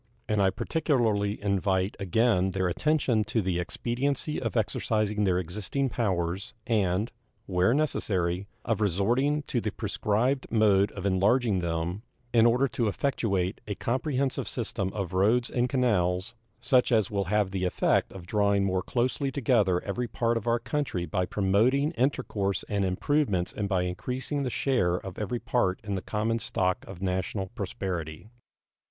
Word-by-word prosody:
And 105 -1 +1
I 95 - +4
particularly 110 - 0
invite 95 -1 +1
again 100 0 +2
their 95 0 0
attention 125 - +1
to 115 - 0
the 90 -4 0
expediency 125 - -2
of 115 -6 -2
exercising 105 -1 0
their 90 -2 +2
existing 105 - -2
powers, 95 -5 -2
and, 105 -1 +1 0.3
where 90 +2 +2
necessary, 95 - 0 0.2
of 110 -2 0
resorting 120 - +1
to 120 -4 -2
the 110 - -2
prescribed 115 +5 0
mode 105 -3 +3
of 100 -1 -6
enlarging 100 +2 +2
them, 85 +3 -2 0.3
in 115 -1 +6
order 125 +4 +3
to 120 -2 -1
effectuate 100 -6 -1
a 105 - -3
comprehensive 130 0 -1
system 105 -5 -2
of 95 -4 -4
roads 110 +6 +2
and 125 0 +1
canals, 105 -7 +1 0.3
such 130 -2 +3
as 110 -4 +2
will 100 -1 0
have 105 +1 +1
the 95 -1 -1
effect 90 - +1
of 95 -3 -10
drawing 100 +1 +2
more 95 -1 0
closely 130 +6 -1
together 110 -9 +2
every 120 +5 -2
part 115 0 0
of 115 0 -3
our 115 0 +3
country 125 - -2
by 90 +3 -1
promoting 115 +10 +2
intercourse 125 - -1
and 100 -1 0
improvements 95 -1 0
and 100 -2 -3
by 95 -3 +1
increasing 125 +10 -3
the 130 - -1
share 120 -9 +1
of 90 0 -6
every 120 +3 -2
part 95 -8 0
in 100 -2 -3
the 95 - -2
common 110 +3 -1
stock 90 -4 -1
of 95 -1 -8
national 95 +1 -2
prosperity. 90 -1 -5
105 Hz, 155 wpm, -28 LUFS, 95-120 Hz, 0.3 s, in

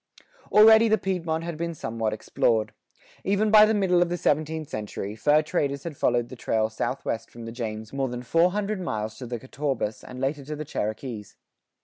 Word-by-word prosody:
Already 220 +1 +8
the 220 0 +4
Piedmont 170 -5 -2
had 170 -2 -5
been 170 0 -3
somewhat 115 -4 -2
explored.[87:4] 110 0 0 0.5
Even 205 +2 +1
by 215 0 +8
the 220 - +2
middle 185 -3 +3
of 175 - +2
the 175 - -1
seventeenth 155 0 0
century, 105 -2 -5
fur 150 +7 +3
traders 140 -2 -1
had 165 -3 -6
followed 120 -2 +1
the 130 - -8
trail 110 -2 0
southwest 115 -1 -3
from 115 -1 -10
the 115 - -6
James 110 -2 -5
more 135 -1 0
than 125 0 -5
four 165 +7 +3
hundred 205 0 -2
miles 110 -9 -4
to 125 - -6
the 120 0 -3
Catawbas 130 -3 -3
and 125 0 -9
later 140 +2 -1
to 150 +3 -5
the 155 +1 -6
Cherokees. 110 -3 -4
140 Hz, 195 wpm, -26 LUFS, 115-170 Hz, 0.5 s, Already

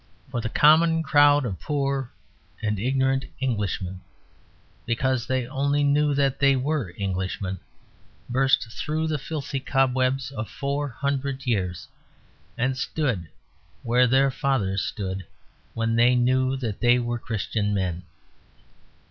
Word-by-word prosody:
For 120 -3 -2
the 110 - -3
common 160 +4 +5
crowd 145 -2 +5
of 100 -6 -4
poor 140 -3 -2 0.5
and 105 -2 -1
ignorant 135 +3 +1
Englishmen, 100 -7 -2 0.9
because 120 0 0
they 130 -1 0
only 140 +2 0
knew 145 0 +2
that 140 -2 +1
they 140 -1 +4
were 130 - -2
Englishmen, 95 -1 -3 0.7
burst 130 -2 +2
through 155 +5 -2
the 155 -2 -1
filthy 140 -1 -4
cobwebs 130 0 +1
of 110 -6 -5
four 140 +5 -2
hundred 140 +1 -3
years 95 -8 -1 0.7
and 130 +2 0
stood 130 - -2 0.5
where 125 +2 +3
their 135 +2 +3
fathers 125 -10 0
stood 95 -2 -4 0.5
when 115 0 0
they 120 +2 +5
knew 130 +2 +2
that 115 -6 -4
they 120 0 +4
were 120 -1 -2
Christian 105 -2 -2
men. 90 -4 -1
130 Hz, 125 wpm, -25 LUFS, 110-140 Hz, 0.9 s, common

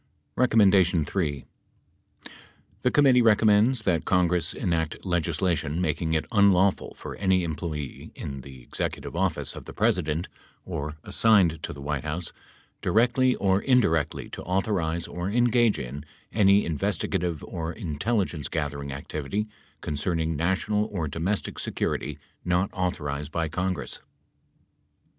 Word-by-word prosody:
The 95 - +3 1.5
committee 135 -4 +5
recommends 110 +2 +4
that 85 -5 +1
Congress 90 -2 +2
enact 80 -1 -2
legislation 85 -2 0
making 80 -1 0
it 80 - 0
unlawful 100 -3 +3
for - - -7
any 95 -2 +2
employee 75 -3 -5
in 70 -1 -6
the 65 -2 -12
Executive - - -4
Office 85 -2 -1
of - - -9
the - - -9
President, 80 +3 +1 0.4
or 75 +1 -4
assigned 95 -9 +3
to - - -4
the 70 - -9
White 75 -2 -2
House, 80 +3 -4 0.5
directly 125 +3 +3
or 95 0 +2
indi 125 -4 +4
rectly 80 -3 -1
to - - -6
authorize 90 -3 -1
or 90 +2 -4
engage 120 0 +3
in 65 +3 -6 0.3
any 100 -1 +5
investigative 80 +1 -1
or 80 -1 -4
intelligence 85 - -2
gathering 70 -3 -3
activity 75 +8 -3 0.4
concerning 80 +2 -1
national 95 +6 +1
or 85 -7 -3
domestic 85 +8 -2
security 75 -1 -2 0.3
not 90 +2 +1
authorized 75 -5 -2
by 80 -1 -1
Congress. 90 +3 -3
85 Hz, 120 wpm, -26 LUFS, 75-100 Hz, 1.5 s, committee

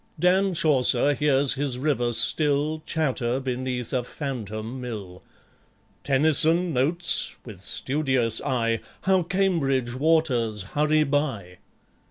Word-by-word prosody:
Dan 185 +1 +2
Chaucer 145 -3 +3
hears 140 -2 +1
his 135 -2 -2
river 125 -3 0
still 145 +6 +1
Chatter 130 -5 -1
beneath 130 -2 -4
a 125 -1 0
phantom 120 -3 -6
mill. 100 -7 -7 0.8
Tennyson 160 +5 +3
notes, 160 +7 +1
with 105 -7 -11
studious 130 -1 0
eye, 115 -5 0 0.2
How 190 -1 +2
Cambridge 160 -9 0
waters 130 - +1
hurry 150 +1 +2
by 135 - -2
135 Hz, 105 wpm, -24 LUFS, 120-155 Hz, 0.8 s, Chaucer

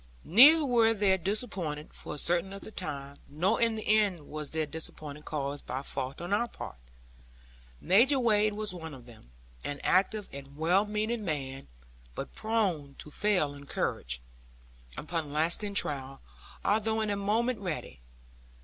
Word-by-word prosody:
Neither 290 - +8
were 230 -3 +4
they 200 -2 +4
disappointed, 185 -6 -3
for - - -7
a - - -8
certain 175 +4 +1
length 195 0 -9
of 220 - -11
time; 140 -5 -5
nor 180 +11 +1
in 230 -1 +3
the 215 - -4
end 205 -5 +3
was 150 0 -6
their 160 -1 -1
disappointment 150 -1 -7
caused 145 -1 -3
by 130 +2 -3
fault 135 -1 -4
on 175 +3 -3
our 235 +4 +2
part. 60 - -9 1.0
Major 245 - +5
Wade 215 -3 +3
was 215 -2 -1
one 160 -4 -7
of 125 -3 -13
them; 120 -2 -14 0.4
an 145 0 -4
active 200 +2 +2
and 140 +1 -9
well 180 +6 +3
meaning 215 +2 -1
man; 135 -6 -4 0.5
but - - -6
prone 185 -11 -1
to 150 - -9
fail 180 -6 +1
in 140 0 -12
courage, - - -2 0.7
upon 160 -2 -3
lasting 170 +7 0
trial; 135 -6 -1 0.5
although 220 +1 +2
in 215 -1 0
a - - +1
moment 220 +4 0
ready. 155 - -5
180 Hz, 160 wpm, -30 LUFS, 145-215 Hz, 1.0 s, Neither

